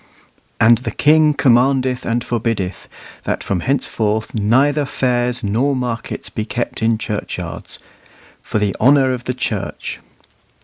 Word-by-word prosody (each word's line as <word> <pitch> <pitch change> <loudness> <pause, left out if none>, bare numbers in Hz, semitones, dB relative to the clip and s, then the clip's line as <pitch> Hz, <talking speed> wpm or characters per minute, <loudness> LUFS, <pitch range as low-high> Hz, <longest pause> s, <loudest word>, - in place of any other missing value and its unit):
"And 115 +1 +6
the 125 - -4
King 150 0 +4
commandeth 130 0 +2
and 115 +1 0
forbiddeth, 115 -5 -3 0.3
that - - -2
from 95 - -1
henceforth 110 -1 -1
neither 130 +8 +2
fairs 125 -2 0
nor 120 +8 +1
markets 120 -2 -4
be 110 - -3
kept 120 +2 -4
in 110 0 +2
Churchyards, 105 -1 -5 0.6
for - - -3
the 105 -2 0
honour 135 +1 +4
of 125 -1 -6
the 125 - -2
Church." 125 - -4
120 Hz, 130 wpm, -18 LUFS, 110-130 Hz, 0.6 s, And